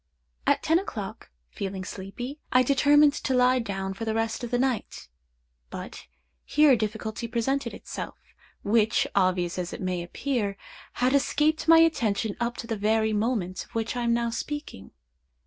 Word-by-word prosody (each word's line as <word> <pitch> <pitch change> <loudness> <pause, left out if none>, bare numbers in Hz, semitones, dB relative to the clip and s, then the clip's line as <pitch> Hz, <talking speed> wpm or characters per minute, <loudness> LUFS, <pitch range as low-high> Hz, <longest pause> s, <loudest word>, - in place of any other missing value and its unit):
"At - - +3
ten 325 +2 +3
o'clock, 215 - -7 0.2
feeling 195 -1 -4
sleepy, 240 +10 -7
I 255 0 +5
determined 285 +2 +5
to 265 -2 -1
lie 250 +1 +4
down 195 -4 -3
for 225 - -7
the 220 -1 -1
rest 225 +2 -1
of 240 - -3
the 245 - +1
night; 255 - -2 0.6
but - - -8 0.4
here 300 -1 +4
a - - +7
difficulty 220 +1 -3
presented 260 +4 -1
itself, - - -7 0.5
which, 220 +1 +3
obvious 185 -2 +1
as 175 -1 -4
it - - -6
may 185 -1 -2
appear, 200 +2 -2 0.4
had 250 +2 +1
escaped 300 +3 +2
my 330 0 +8
attention 225 -10 +2
up 240 0 -2
to - - -5
the 225 -1 -3
very 220 +1 +1
moment 210 -4 -1
of - - -25
which 225 +1 -1
I 245 - -2
am 235 0 +2
now 235 0 0
speaking. 290 - -5
230 Hz, 165 wpm, -26 LUFS, 200-260 Hz, 0.6 s, my